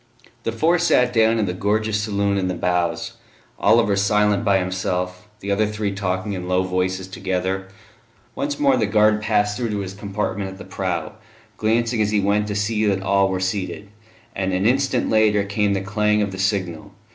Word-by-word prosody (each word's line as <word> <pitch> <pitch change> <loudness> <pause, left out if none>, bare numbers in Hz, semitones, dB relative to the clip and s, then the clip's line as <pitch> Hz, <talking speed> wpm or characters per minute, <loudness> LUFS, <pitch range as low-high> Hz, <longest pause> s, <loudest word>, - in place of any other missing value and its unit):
The 115 - 0
four 165 +10 +2
sat 125 -7 +3
down 115 0 +4
in 110 - +1
the 90 - -2
gorgeous 105 +2 0
saloon 100 -1 0
in 95 - -1
the 90 - -2
bows; 85 -2 -1 0.4
Oliver 100 -1 +4
silent 105 +1 +2
by 100 -3 +3
himself, 90 0 -3
the 100 - -3
other 105 +2 +2
three 105 -1 -2
talking 95 0 -2
in 90 -2 -5
low 90 0 +2
voices 95 0 -1
together. 95 0 -2 0.7
Once 145 +3 -3
more 140 -3 +4
the 110 -4 +1
guard 105 0 +3
passed 105 -1 +1
through 120 -2 -2
to 105 - -2
his 95 -1 -6
compartment 100 -1 -3
at 95 - -10
the - - -10
prow, 90 -1 -3 0.4
glancing 115 +2 +1
as 105 - +2
he 105 -1 +2
went 100 +1 +1
to 105 - -3
see 105 +1 0
that 95 -1 0
all 100 0 +3
were 95 -1 -1
seated; 95 +2 -3 0.5
and 95 -1 -1
an 95 +2 0
instant 130 +1 +2
later 105 -2 +3
came 100 0 0
the 95 - -1
clang 105 +1 +1
of 100 - -3
the 95 - -7
signal. 95 -2 -2
100 Hz, 195 wpm, -22 LUFS, 95-105 Hz, 0.7 s, down